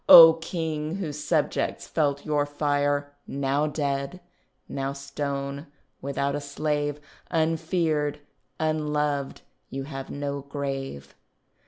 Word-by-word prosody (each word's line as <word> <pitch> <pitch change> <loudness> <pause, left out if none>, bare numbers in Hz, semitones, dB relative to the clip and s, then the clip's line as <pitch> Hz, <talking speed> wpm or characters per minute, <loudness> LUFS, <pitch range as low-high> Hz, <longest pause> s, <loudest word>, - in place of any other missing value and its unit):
O 165 -1 +13
King, 160 -1 -3
whose 150 -6 -4
subjects - - +1
felt 140 -2 +1
your 145 -1 +1
fire, 145 -1 +1
Now 140 +2 +1
dead, 145 +2 -1 0.5
now 135 0 -2
stone, 140 +1 -4 0.3
without 140 0 -1
a 145 - -2
slave, 145 0 -1 0.3
Unfeared, 160 -2 +1 0.4
unloved, 150 -3 0 0.3
you 135 0 -4
have 135 -1 -6
no 140 0 -3
grave. 135 - -4
145 Hz, 105 wpm, -27 LUFS, 140-155 Hz, 0.5 s, O